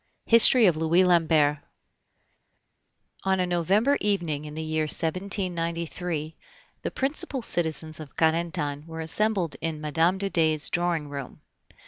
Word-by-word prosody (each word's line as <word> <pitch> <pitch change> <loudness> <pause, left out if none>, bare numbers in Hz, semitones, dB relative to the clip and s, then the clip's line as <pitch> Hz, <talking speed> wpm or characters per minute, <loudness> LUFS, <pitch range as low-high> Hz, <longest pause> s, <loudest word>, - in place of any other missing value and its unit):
HISTORY 230 +1 +8
OF 175 -5 +2
LOUIS 165 +3 +2
LAMBERT. 160 -4 +2 1.6
On 190 0 0
a 180 - +1
November 195 - 0
evening 170 -8 -2
in 150 0 -9
the 160 - -5
year 155 0 -2
1793 170 -2 -3 0.5
the - - -4
principal 270 -1 -3
citizens 160 -4 -1
of 150 -3 -11
Carentan 160 -2 -1
were 165 0 -7
assembled 185 0 0
in 160 -1 -4
Mme. 160 +4 0
de 195 0 -3
Dey's 155 -2 +1
drawing 170 -3 -1
room. 140 -3 -9
165 Hz, 125 wpm, -25 LUFS, 155-185 Hz, 1.6 s, HISTORY